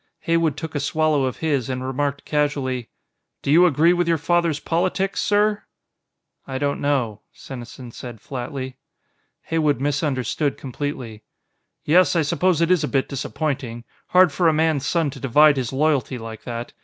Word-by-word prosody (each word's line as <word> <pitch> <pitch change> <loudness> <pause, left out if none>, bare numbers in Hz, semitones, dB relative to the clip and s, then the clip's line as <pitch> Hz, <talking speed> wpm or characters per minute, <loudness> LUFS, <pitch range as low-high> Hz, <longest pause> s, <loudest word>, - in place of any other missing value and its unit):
Heywood 165 -3 +1
took 160 +1 -6
a 145 - -1
swallow 150 -1 +1
of 130 - -3
his, 140 -6 0
and 130 0 -3
remarked 140 +2 -2
casually: 140 -5 -1 0.5
"Do 140 - 0
you 175 +4 +7
agree 165 +2 +4
with 175 -1 0
your 165 -1 +3
father's 165 -1 +1
politics, 185 +4 -1
sir?" 210 0 +2 0.9
"I 130 - -3
don't 140 +1 -1
know," 125 -7 0
Senesin 125 -1 -9
said 120 -1 -9
flatly. 130 +1 -6 0.7
Heywood 155 -5 +1
misunderstood 145 -1 -1
completely. 130 -5 -5 0.6
"Yes, 180 +4 +4
I 165 - +3
suppose 175 +3 +1
it 170 +1 +3
is 180 -4 +3
a - - 0
bit 135 +1 0
disappointing. 135 -4 -3 0.2
Hard 180 -2 +5
for 170 +4 +2
a 160 - +4
man's 155 -3 +1
son 165 -5 +1
to - - -10
divide 145 +3 +5
his 125 -3 -2
loyalty 140 -2 +1
like 115 -2 -9
that. 120 0 -5
145 Hz, 160 wpm, -22 LUFS, 130-160 Hz, 0.9 s, you